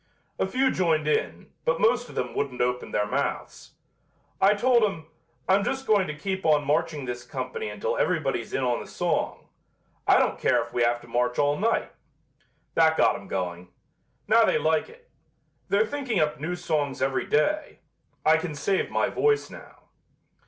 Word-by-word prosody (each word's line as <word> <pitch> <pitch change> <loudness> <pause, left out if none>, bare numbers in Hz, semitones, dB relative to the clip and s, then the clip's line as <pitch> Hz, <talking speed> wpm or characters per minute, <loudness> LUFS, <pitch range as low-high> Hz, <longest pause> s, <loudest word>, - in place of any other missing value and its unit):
A - - +1
few 260 +6 +1
joined 160 -4 +1
in, 155 - -1
but - - +1
most 245 +2 +2
of - - -12
them 125 - -2
wouldn't 135 -3 -3
open 125 0 -1
their 105 - 0
mouths. 105 - -4 0.7
I 200 +2 +5
told 240 +2 +3
'em, 170 -7 -1 0.4
'I'm 195 +1 +4
just 265 +4 -2
going 205 -5 +3
to 155 -1 -5
keep 190 +3 -3
on 150 -2 +3
marching 145 0 0
this 120 -1 -5
company 440 - -5
until 475 0 -2
everybody's - - -1
in 135 - -1
on 120 -1 +1
the - - -9
song. - - -2 0.6
I - - +6
don't - - +1
care - - +3
if - - -13
we 120 - 0
have 120 0 +2
to 120 - -15
march 125 +1 0
all 145 0 +2
night.' 225 +8 0 0.8
That 160 -1 +4
got - - +4
'em 100 - -9
going. 90 -1 -4 0.6
Now 225 +2 +5
they - - +3
like 160 0 +1
it. 480 +1 -18 0.6
They're 460 - +3
thinking 275 - -3
up 150 -4 0
new 170 +4 -3
songs 150 -5 -2
every 135 0 0
day. 300 - 0 0.4
I 160 +1 +6
can 160 -2 -4
save 190 +7 0
my - - +1
voice 435 0 +1
now." - - -13
160 Hz, 180 wpm, -26 LUFS, -, 0.8 s, I